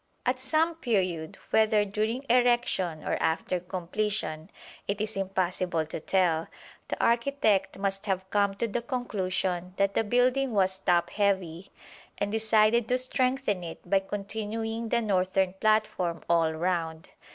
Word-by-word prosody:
At 255 +1 +1
some 310 +6 +1
period, 185 - -1
whether 215 -1 +4
during 215 +6 -2
erection 240 -9 +2
or - - -2
after 170 +2 0
completion 180 -2 -3 0.4
it 200 +1 -1
is 215 +1 -2
impossible 185 -3 -1
to 155 - -6
tell, 165 -2 +1 0.4
the - - -4
architect 235 -5 +2
must 195 +1 -2
have 190 -1 -1
come 200 -1 +2
to 230 +4 -1
the 230 +2 -2
conclusion 185 -7 -2
that 200 0 +2
the 225 - +2
building 250 +3 +2
was 190 -2 +1
top 175 -3 +2
heavy, 190 -3 -1 0.5
and 205 0 -1
decided 220 +1 +3
to 250 - +2
strengthen 255 -6 0
it 165 +1 -9
by 195 +2 +4
continuing 220 +3 -4
the 235 0 +1
northern 190 -2 +1
platform 215 -6 +1
all 165 -1 +3
round. 165 0 -2
200 Hz, 140 wpm, -28 LUFS, 180-225 Hz, 0.5 s, whether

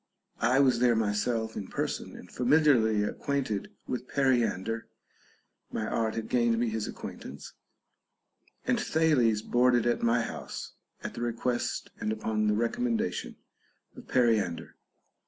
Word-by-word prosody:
I 125 +4 +3
was 130 -4 +4
there 120 -1 +4
myself 110 +1 0
in 100 - -5
person - - -3
and 90 - -12
familiarly 125 -6 +4
acquainted 130 -2 -2 0.2
with 125 0 -4
Periander 115 -5 +1 0.8
(my 110 - -2
art 110 0 -1
had 115 -1 -3
gained 120 -2 +2
me 120 0 +1
his 110 -1 -2
acquaintance); 70 +2 -8 1.1
and - - +2
Thales 125 -10 +2
boarded 120 -1 +3
at 120 - +1
my 115 0 +3
house, 115 - -6 0.3
at - - -4
the - - -6
request 120 +1 -2
and 105 - -1
upon 110 0 -1
the 105 - +3
recommendation 225 - -1 0.6
of 250 -3 -12
Periander. 110 -9 +1
115 Hz, 130 wpm, -29 LUFS, 110-125 Hz, 1.1 s, was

